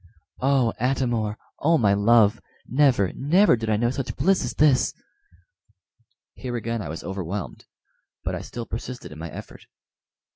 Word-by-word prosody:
"Oh, 130 -4 +2
Atam 125 0 +1
or! 110 -2 -2 0.2
oh, 165 +3 +3
my 105 -6 +3
love! 105 +1 +4 0.2
never, 125 -7 +2
never 170 +4 +4
did 115 -1 -4
I 105 - +2
know 120 +2 +1
such 135 -1 -4
bliss 185 +7 +2
as 125 - -4
this." 145 -4 +3 1.4
Here 125 -2 -5
again 115 -1 -2
I 85 - -6
was 80 +1 -6
overwhelmed, 95 +1 -5 0.6
but - - -2
I - - -3
still 120 -1 -7
persisted 115 -6 -7
in 75 - -10
my 80 +1 -6
effort. - - -11
120 Hz, 155 wpm, -24 LUFS, 105-130 Hz, 1.4 s, love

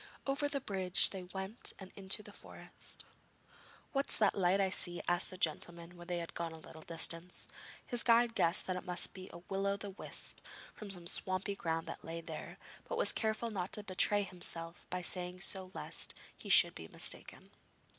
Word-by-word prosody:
Over 280 +1 +2
the 280 - 0
bridge 190 -6 +3
they 190 -2 -5
went 190 +5 -2
and 190 -1 -9
into 195 +2 +2
the - - -9
forest. - - -9 0.9
'What 275 0 +1
is - - -2
that 210 -3 +5
light 190 0 +3
I 190 -1 +3
see?' 175 -2 -1
asked 175 0 +2
the 185 - -8
gentleman 170 +1 -2
when 175 0 -10
they 175 -1 0
had 170 -1 -4
gone 170 -1 -2
a - - -8
little 160 0 -11
distance. 165 +2 -2 0.4
His 245 -2 0
guide 235 0 +5
guessed 170 -4 +3
that 185 - 0
it 180 - -3
must 180 -1 +3
be 185 -1 -8
a 170 - -9
will 195 0 0
o' 200 0 +2
the 200 0 -5
wisp 190 - -6 0.3
from 210 - -8
some 180 -3 -2
swampy 185 +3 +1
ground 165 -3 -1
that 165 - -7
lay 165 +1 -4
there, 165 - -6 0.3
but - - -2
was - - +4
careful 220 +1 0
not 190 -2 -2
to 210 - +3
betray 205 +1 +3
himself 175 -2 -2
by 180 0 -2
saying 180 0 +1
so 190 -1 -1
lest - - -1 0.2
he - - -9
should - - +8
be - - -7
mistaken. - - -2
185 Hz, 195 wpm, -36 LUFS, 175-200 Hz, 0.9 s, should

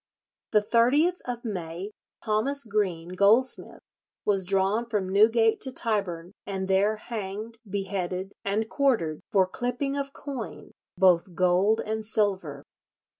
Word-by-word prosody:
"The 210 - +5
30th 270 - +3
of 245 -1 -5
May 180 -1 -5 0.3
Thomas 245 +6 +2
Green, 195 -6 -1
goldsmith, 205 +8 +2 0.4
was 195 -3 +1
drawn 195 +4 +2
from 210 -5 -1
Newgate 225 +3 +4
to 260 - 0
Tyburn, 195 -8 -2 0.2
and 190 -1 -3
there 195 +3 +3
hanged, 215 0 -6
beheaded, 190 -1 -3
and 210 +3 0
quartered, 225 - +1
for 190 -2 +4
clipping 245 +7 -3
of 280 -1 -3
coin, 240 - -7 0.3
both 180 -1 +3
gold 185 +5 +3
and 220 0 -2
silver." 195 -10 -1
205 Hz, 125 wpm, -27 LUFS, 190-230 Hz, 0.4 s, The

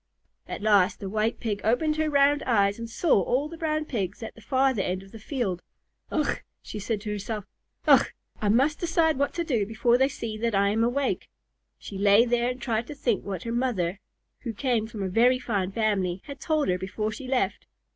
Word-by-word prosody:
At - - -6
last 205 -2 +4
the 195 -2 -5
White 215 +2 0
Pig 210 -3 -2
opened 305 +7 +2
her 315 0 +1
round 285 0 +4
eyes 200 -3 +2
and 230 0 -5
saw 240 - +3
all 255 - 0
the 335 - -9
Brown 310 -1 -1
Pigs 205 -5 -3
at 220 - -6
the 225 - -16
farther 260 -1 +2
end 185 0 -2
of 195 - -16
the 225 - -10
field. 215 - -2 0.5
"Ugh!" - - 0 0.2
said 210 - -6
she 220 +2 -1
to 210 +1 -5
herself, 210 0 -4 0.4
"Ugh! - - +6 0.3
I 210 - +1
must 270 +8 +3
decide 325 -4 +2
what 280 - +1
to 340 - 0
do 245 -10 +1
before 235 +3 +2
they 265 +1 +4
see 225 -6 -5
that 230 -2 0
I 200 0 +3
am 220 +2 +1
awake." 260 +3 0 0.5
She 195 - -8
lay 205 +3 +6
there 240 0 +1
and 250 +1 -4
tried 235 -2 -1
to 300 - -7
think 240 -6 0
what 190 -4 -5
her 230 - -3
mother, 205 -7 0 0.4
who 235 -3 -5
came 235 -1 0
of 230 - -14
a 195 -2 -2
very 240 +7 +4
fine 200 -7 -2
family, 195 -4 0
had 280 -1 -8
told 310 -2 0
her 180 0 +1
before 205 +3 -3
she 250 +5 -7
left. 250 -7 -1
230 Hz, 215 wpm, -26 LUFS, 205-265 Hz, 0.5 s, Ugh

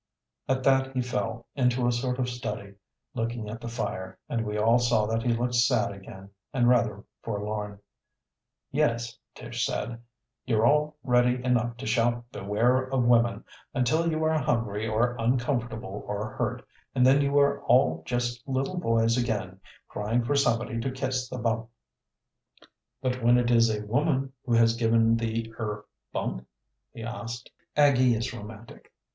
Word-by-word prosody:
At 130 0 +1
that 135 0 +3
he 130 - +2
fell 115 0 -3
into 125 -2 +1
a 120 - +3
sort 125 +1 -1
of 130 -1 0
study, 105 -5 -5 0.4
looking 115 -1 -3
at 115 +2 -7
the - - -6
fire, 105 -5 -4
and 115 -1 -1
we 105 -1 -3
all 115 +3 +4
saw 120 -3 +2
that 115 +1 -1
he 120 0 +1
looked 120 +1 0
sad 120 -4 +3
again 95 0 -11 0.2
and 120 -3 +2
rather 115 -5 +2 0.2
forlorn. 105 -1 -4 0.9
"Yes," 120 -5 0 0.2
Tish - - -4
said, 115 +1 -3 0.4
"you're 115 -3 +2
all 150 +3 +2
ready 125 -1 +2
enough 120 -2 +1
to - - -7
shout 120 +1 +1
'Beware 110 +6 +1
of 130 -1 0
woman' 120 -1 +3 0.3
until 160 +7 +2
you 160 0 -1
are 155 0 +2
hungry 115 -5 -1
or 120 +3 +1
uncomfortable 120 -4 -1
or 105 +1 -3
hurt, - - -3 0.3
and 125 -1 +4
then 135 +2 +6
you 140 0 +1
are 140 0 +3
all 80 0 +4
just 120 +3 -2
little 135 +6 -1
boys 115 -5 +2
again, 105 -6 -2 0.3
crying 115 +4 -1
for 145 +5 0
somebody 115 -4 +1
to 115 - -1
kiss 130 -1 -2
the 130 - -5
bump." 115 -1 -1 1.3
"But 130 -1 -1
when 120 +1 +5
it 120 0 +2
is 115 -1 +5
a 105 -1 -2
woman 135 +3 0
who 120 - +1
has 115 0 +5
given 115 -1 +3
the 115 0 -3
er 105 -2 -4 0.3
bump?" 60 0 -3 0.4
he 115 - -9
asked. 120 +1 -6 0.3
Aggie 130 -4 +5
is 115 +3 -3
romantic. 110 0 -11
120 Hz, 160 wpm, -27 LUFS, 110-125 Hz, 1.3 s, then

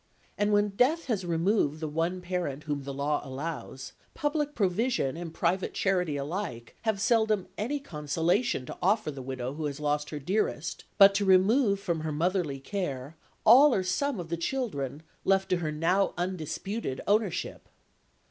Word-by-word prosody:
And 205 0 +1
when 205 0 +3
death 260 +11 +2
has 200 -7 -2
removed 165 -2 +1
the 155 - -3
one 165 +4 -1
parent 175 -6 -3
whom 145 -3 -3
the 140 - -4
law 145 +2 0
allows, 135 -1 -6 0.2
public 295 0 -1
provision 200 - +1
and 170 -1 -6
private 175 +3 -1
charity 180 -6 +1
alike 140 - -5
have 220 -3 0
seldom 220 -3 +2
any 265 +8 -2
consolation 165 - 0
to - - -8
offer 200 -3 +2
the 135 -2 -8
widow 130 0 -4
who 155 +1 -4
has 145 0 -3
lost 150 0 -1
her 150 - -5
dearest, 170 +1 -2
but 200 -1 +8
to 200 +1 +1
remove 200 +3 +4
from 170 -4 -2
her 155 0 -3
motherly 165 -2 0
care 140 -4 -4 0.3
all 255 +5 +8
or 190 - +1
some 230 +7 -1
of 170 -2 -6
the 170 - -1
children 160 - -3 0.2
left 195 0 +2
to 180 - +2
her 160 -3 -2
(now 175 +6 +1
undisputed) 180 - -3
ownership. 205 -2 0
180 Hz, 165 wpm, -29 LUFS, 150-205 Hz, 0.3 s, but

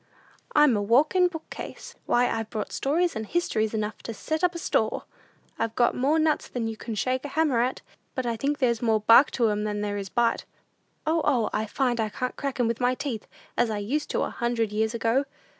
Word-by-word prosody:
"I'm 295 -5 +6
a 205 - 0
walkin' 295 - +4
book 320 -3 -8
case. - - -8
Why, 245 +1 +3
I've 225 -1 -2
brought 215 -2 -4
stories 330 +4 0
and 220 - -3
histories 220 -6 0
enough 215 0 -3
to 230 - -6
set 315 - -3
up 355 -1 +2
a - - -2
store! 340 - 0 0.6
I've 225 0 -1
got 240 -1 +3
more 280 +5 +2
nuts 315 -1 +1
than 235 -2 -3
you 225 - -4
can 225 0 -6
shake 255 +5 0
a - - -4
hammer 285 -5 +2
at; 255 +2 -1 0.3
but 255 - -2
I 235 -1 0
think 280 +6 -1
there's 235 -5 +1
more 220 -3 +2
bark 230 +6 +7
to 235 -3 +3
'em 210 0 -1
than 210 -1 -2
there 205 0 -2
is 195 -1 -5
bite. 235 +1 +1 0.6
O, 320 +1 +2
O, 245 -7 +2
I 220 +1 -1
find 245 +1 0
I 220 -1 0
can't 250 +4 -3
crack 275 -2 -4
'em 240 - +3
with 230 +1 -2
my 250 +1 +2
teeth, 260 -6 -4 0.3
as 235 - +2
I 215 - -2
used 260 +9 -2
to - - 0
a - - -3
hundred 235 -3 -1
years 220 +2 0
ago! 235 +4 +1
240 Hz, 225 wpm, -26 LUFS, 220-280 Hz, 0.6 s, bark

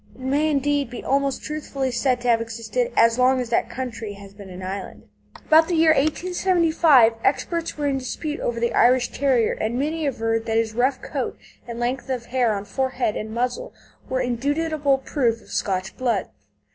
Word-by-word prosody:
It - - -15
may 285 +4 +1
indeed 285 -2 0
be 245 - -8
almost 275 0 0
truthfully 280 -3 -3
said 245 0 0
to 245 - -3
have 230 -1 +4
existed 230 - -3
"as 230 +1 +4
long 255 +1 +4
as 245 -2 -4
that - - +1
country 230 -4 -5
has 200 0 -13
been 200 -1 -12
an 185 0 -9
island." 190 +1 -6 0.4
About 320 +1 +5
the 350 - 0
year 320 0 +5
1875, 320 -4 +3
experts 335 +4 -1
were 295 - -2
in 275 -1 0
dispute 295 +4 -4
over 235 -1 -2
the 235 0 0
Irish 250 0 +4
Terrier, 255 -5 +2
and 225 +3 -2
many 305 +3 -1
averred 225 -3 -1
that 225 0 +1
his 225 -1 0
rough 250 +4 0
coat - - -4 0.3
and 235 0 -6
length 245 +2 -2
of 250 -3 -3
hair 245 -2 +1
on 200 -1 -3
forehead 255 +1 -1
and 215 - -4
muzzle 250 - -3 0.3
were 260 - 0
indubitable 285 +3 0
proof 250 -4 -1
of - - -20
Scotch 190 -1 -2
blood. 235 -7 -1
255 Hz, 185 wpm, -23 LUFS, 230-290 Hz, 0.4 s, About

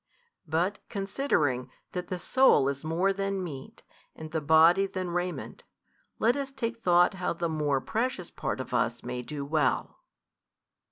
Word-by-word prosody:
but 175 +6 0
considering 195 - 0 0.2
that 180 -1 -4
the 185 - -3
soul 215 - +4
is 140 +1 -2
more 170 +5 +1
than 195 -1 -2
meat, 140 -6 -8 0.3
and 155 0 -9
the 160 -1 -1
body 165 +6 +5
than 185 -2 -4
raiment, 175 +1 -4 0.5
let 235 +3 +3
us 275 -1 -3
take 230 -3 -4
thought 175 0 +4
how 180 -1 -2
the 170 0 -2
more 150 -4 0
precious 220 - -2
part 135 -2 -3
of 130 - -6
us 120 -1 0
may 125 0 -4
do 140 +3 -5
well. 155 +2 0
175 Hz, 155 wpm, -28 LUFS, 145-195 Hz, 0.5 s, body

